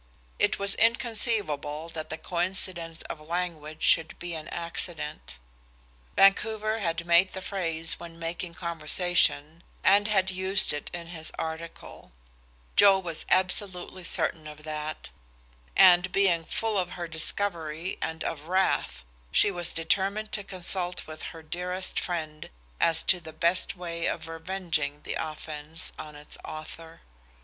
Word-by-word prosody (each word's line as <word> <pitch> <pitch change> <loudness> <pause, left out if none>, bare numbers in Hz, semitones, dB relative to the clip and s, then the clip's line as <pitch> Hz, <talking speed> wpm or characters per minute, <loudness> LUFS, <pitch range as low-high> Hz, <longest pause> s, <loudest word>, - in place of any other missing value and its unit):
It - - +3
was 200 0 +1
inconceivable 210 - 0
that 160 -1 -6
the 160 - -3
coincidence 175 -2 -2
of 155 - -7
language 160 -2 -3
should 160 -1 +4
be 175 0 -5
an 155 -1 -5
accident. 170 - -3 0.8
Vancouver 215 +2 +4
had 170 -3 -1
made 170 +2 +5
the - - -4
phrase 165 -5 -2
when 170 -1 -9
making 170 +1 -4
conversation, 170 -1 +1 0.2
and 200 +2 +6
had 190 -3 +2
used 190 0 +2
it 145 - -4
in 170 -1 -6
his 160 -2 -3
article; 160 - -6 0.6
Joe 200 -1 +8
was 170 -4 -5
absolutely 185 0 +2
certain 160 -2 0
of 150 0 -10
that, 155 0 -4 0.7
and 180 0 +7
being 180 -5 +3
full 220 +2 -1
of 180 -1 -2
her 175 -1 -3
discovery 165 0 -1
and 160 0 -3
of 155 -2 -4
wrath, 170 - +1 0.3
she 205 - +5
was 175 -3 -3
determined 195 +6 0
to 205 - -2
consult 180 -1 0
with 155 0 -8
her 165 -1 -11
dearest 180 +3 -2
friend 155 -4 -4 0.3
as 165 -1 +3
to 185 - +3
the 160 -2 -10
best 170 +4 +2
way 170 -2 -3
of 160 0 -2
revenging 165 -3 -2
the - - -3
offense 155 0 -6
on 150 -1 -8
its 145 0 -7
author. 160 +1 -8
170 Hz, 140 wpm, -28 LUFS, 160-185 Hz, 0.8 s, Joe